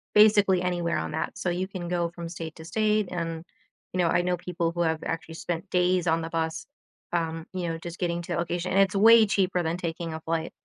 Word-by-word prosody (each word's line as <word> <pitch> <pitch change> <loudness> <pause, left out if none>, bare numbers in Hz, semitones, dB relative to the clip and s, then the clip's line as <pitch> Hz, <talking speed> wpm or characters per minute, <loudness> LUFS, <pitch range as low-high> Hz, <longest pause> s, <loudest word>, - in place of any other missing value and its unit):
basically 205 -3 +6
anywhere 175 -2 0
on - - -3
that 160 - -3
so, 180 - -1
you 185 +2 -2
can 185 -3 -6
go 175 -1 0
from 170 0 -7
state 165 -2 -7
to 160 - -11
state, 215 +1 +1
and, 165 -2 -3 0.5
you 185 - -2
know, 175 - +4
I 175 - +3
know 180 0 +1
people 170 -1 -2
who 175 0 -2
have 160 -1 +1
actually 165 0 -4
spent 175 +3 -4
days 180 0 +2
on 165 0 +2
the 165 - -4
bus, 160 -1 -2 0.5
um, 165 -1 -1
you 180 -2 -2
know, 165 - -3
just 170 +1 -8
getting 175 -1 -1
to - - -8
the - - -1
location 175 +1 -2
and 195 - +3
it's 195 0 +2
way 225 +2 +8
cheaper 185 -2 +1
than 165 +1 -1
taking 170 -1 -4
a - - -5
flight. 165 0 -2
175 Hz, 235 wpm, -27 LUFS, 165-185 Hz, 0.5 s, way